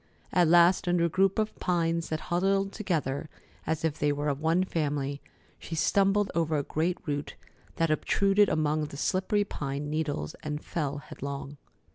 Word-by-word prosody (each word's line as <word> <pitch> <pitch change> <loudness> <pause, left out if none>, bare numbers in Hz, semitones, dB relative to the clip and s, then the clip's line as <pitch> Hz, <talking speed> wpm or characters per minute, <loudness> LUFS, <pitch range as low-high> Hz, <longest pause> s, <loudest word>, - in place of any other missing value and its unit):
At 175 -2 +4
last, 175 +2 +5
under 175 -1 +3
a - - +1
group 190 +3 +2
of 215 0 0
pines 170 -2 0
that 155 0 -2
huddled 195 +2 +2
together 155 - -2 0.4
as 160 0 0
if 160 -2 -1
they 145 0 +2
were 145 +1 -1
of 140 0 -2
one 165 +3 +3
family, 145 -5 -2 0.4
she 165 - -6
stumbled 195 +4 +2
over 160 -2 +1
a 145 - 0
great 165 +5 -1
root 145 -1 -3 0.4
that 165 -1 +1
obtruded 200 +5 +3
among 155 0 +1
the 140 - -9
slippery 190 +6 +1
pine 145 -5 -4
needles 150 - -2
and 150 0 -4
fell 145 -4 -2
headlong. 140 0 -7
160 Hz, 165 wpm, -28 LUFS, 145-180 Hz, 0.4 s, last